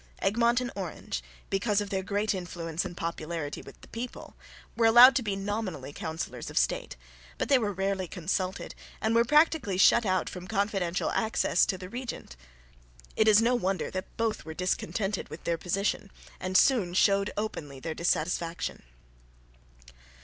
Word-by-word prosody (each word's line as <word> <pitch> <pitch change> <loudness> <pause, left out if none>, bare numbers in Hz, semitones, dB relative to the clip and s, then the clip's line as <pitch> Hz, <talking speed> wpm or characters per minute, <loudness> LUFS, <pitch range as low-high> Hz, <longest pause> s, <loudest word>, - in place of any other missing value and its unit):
Egmont 235 +4 +2
and 250 -1 -3
Orange, 180 - -5 0.3
because 200 +1 +1
of 205 0 -4
their 190 -1 0
great 205 +3 0
influence 175 -2 -4
and 175 -1 -7
popularity 165 -2 -4
with - - -14
the - - -14
people, 240 +2 -7 0.4
were 230 -1 +4
allowed 245 +4 +9
to - - +2
be 205 -4 -2
nominally 195 -8 -4
Councillors 160 +2 -5
of - - -8
State, - - 0 0.4
but - - -2
they 275 - +6
were 210 -3 -1
rarely 195 -1 -1
consulted 185 +2 -3 0.3
and 220 +1 0
were 230 0 +5
practically 300 - +3
shut 235 +5 +6
out 185 -3 0
from 180 0 -7
confidential 195 -4 0
access 220 0 +2
to 190 - -1
the 185 0 -8
regent. 240 - -6 0.8
It 220 - +3
is 215 +1 +6
no 240 +2 +3
wonder 195 -5 -1
that 185 0 -6
both 225 -2 -1
were 160 0 -8
discontented 195 +2 -2
with 155 - -9
their 170 -1 -1
position 195 +3 -1 0.3
and 185 0 +1
soon 195 -10 +3
showed 200 +1 +3
openly 150 -10 -4
their 160 +4 -4
dissatisfaction. 170 0 -1
195 Hz, 160 wpm, -28 LUFS, 175-220 Hz, 0.8 s, allowed